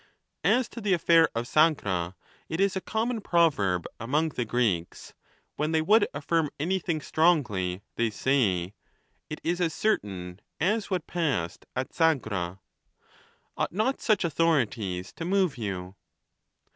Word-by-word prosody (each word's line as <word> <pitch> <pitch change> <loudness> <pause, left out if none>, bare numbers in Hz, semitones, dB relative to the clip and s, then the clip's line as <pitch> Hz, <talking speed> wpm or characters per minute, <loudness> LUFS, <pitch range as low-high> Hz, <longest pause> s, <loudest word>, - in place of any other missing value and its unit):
As 255 0 +3
to 235 - -8
the 200 -2 +2
affair 165 -1 +5
of 115 +1 -1
Sagra, 100 - +2 0.3
it 160 - -3
is 195 -1 +2
a 190 - -2
common 225 +3 -2
proverb 135 - +2
among 150 +8 0
the 125 -5 -3
Greeks; 110 -8 -1 0.4
when 155 +2 -1
they 160 - +3
would 210 +5 +5
affirm 150 +2 0
anything 170 -1 -1
strongly, 105 - +1
they 115 -1 +2
say 105 -7 +1 0.3
" - - -44
It 155 - -5
is 175 +2 -1
as 165 -2 0
certain 95 - -2 0.2
as 205 +6 +1
what 180 -4 -1
passed 135 - -2
at 130 +1 -3
Sagra." 110 - 0 1.0
Ought - - -2
not 220 +8 0
such 215 -4 +2
authorities 120 - 0
to - - -4
move 185 -2 +1
you? 95 -5 -5
155 Hz, 140 wpm, -27 LUFS, -, 1.0 s, affair